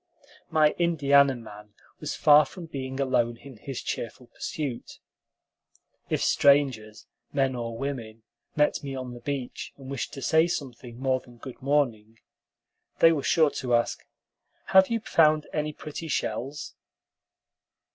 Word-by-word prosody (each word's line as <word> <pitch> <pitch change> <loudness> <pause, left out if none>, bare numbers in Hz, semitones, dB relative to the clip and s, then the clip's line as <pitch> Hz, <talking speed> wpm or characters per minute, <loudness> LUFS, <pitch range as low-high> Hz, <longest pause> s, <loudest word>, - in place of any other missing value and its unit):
My 155 -1 +4
Indiana 140 -5 +4
man 105 -3 -12 0.2
was - - -4
far 150 0 +7
from 180 -3 -10
being 135 -3 -6
alone 120 -3 +1
in 130 0 -13
his 135 +3 -6
cheerful 120 +2 -5
pursuit. 135 0 -6 1.1
If - - 0
strangers, 130 -7 +2 0.3
men 135 -2 +1
or 115 -2 -5
women, 115 -5 -5 0.3
met 150 0 +2
me 135 -1 -5
on 130 -2 -6
the 120 - -9
beach 130 0 -5
and 135 -1 -10
wished 135 - -4
to 135 - -7
say 160 +5 +4
something 125 -7 -6
more 130 -1 +1
than 120 -1 -17
good 130 +1 -10
morning, 120 -6 0 0.8
they 165 - +7
were 155 -3 0
sure 155 +1 +3
to 125 -2 0
ask, 120 - 0 0.7
"Have 190 0 +7
you 230 -1 -1
found 155 -6 +3
any 150 0 -1
pretty 155 +2 -7
shells?" 135 +1 -3
135 Hz, 140 wpm, -27 LUFS, 120-150 Hz, 1.1 s, far